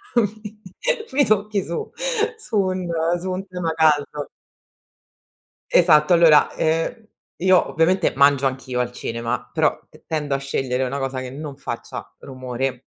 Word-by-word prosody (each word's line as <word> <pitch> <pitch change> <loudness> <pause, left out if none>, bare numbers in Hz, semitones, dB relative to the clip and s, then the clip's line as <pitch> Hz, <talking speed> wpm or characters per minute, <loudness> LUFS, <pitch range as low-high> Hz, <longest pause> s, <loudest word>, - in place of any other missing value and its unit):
mi 215 -1 -1 0.5
mi 285 0 +4
tocchi 210 -1 +1
su 170 - -5 0.5
su 245 - -3
un 185 -2 0 0.3
su 185 - -4
un 185 +1 -4
tema 180 -3 -3
caldo. 150 -2 +1 1.4
Esatto, 160 -1 +5
allora, 165 -3 +6
ehm, 165 +8 -1 0.3
io 185 0 +4
ovviamente 175 +4 +2
mangio 140 -1 +4
anch'io 130 -1 -2
al 125 0 -1
cinema, 115 -1 -4
però - - +1
t - - -20
tendo 150 -3 -1
a - - +1
scegliere 135 -2 -2
una 135 +2 -2
cosa 135 -1 -3
che 130 -1 -6
non 145 0 -7
faccia 140 - -6
rumore 130 -1 -4
155 Hz, 140 wpm, -22 LUFS, 135-185 Hz, 1.4 s, allora